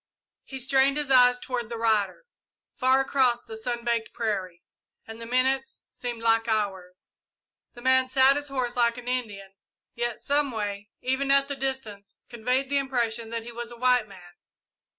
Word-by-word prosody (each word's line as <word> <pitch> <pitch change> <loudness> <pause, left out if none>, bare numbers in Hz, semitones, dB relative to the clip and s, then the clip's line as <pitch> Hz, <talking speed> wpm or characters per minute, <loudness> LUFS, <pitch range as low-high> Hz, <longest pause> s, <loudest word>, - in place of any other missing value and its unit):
He 265 - -8
strained 270 +2 +3
his 295 -2 -2
eyes 250 -1 +6
toward 245 -3 -4
the 235 - -5
rider, 220 - 0 0.5
far 260 0 +3
across 255 -3 +1
the 220 - -9
sun 235 +1 -4
baked 235 -2 -1
prairie, 190 -6 -3 0.4
and 225 +1 -10
the 230 - -7
minutes 265 +2 0
seemed 240 -2 -6
like 225 0 +3
hours. 190 -5 -3 0.6
The 240 - -13
man 260 0 +4
sat 265 +1 +5
his 290 0 -3
horse 255 -3 -2
like 235 -1 +2
an 245 0 -9
Indian, 210 -6 -4 0.4
yet, 240 -1 -3
someway, 215 -8 -1
even 265 +2 -1
at 275 0 +4
the 280 - -4
distance, 265 -7 -5
conveyed 250 +3 -1
the 280 +1 +1
impression 235 -4 -2
that 230 0 -4
he 240 - -9
was 235 0 -7
a 240 - -10
white 250 -2 +3
man. 180 -3 -14
240 Hz, 170 wpm, -26 LUFS, 225-265 Hz, 0.6 s, eyes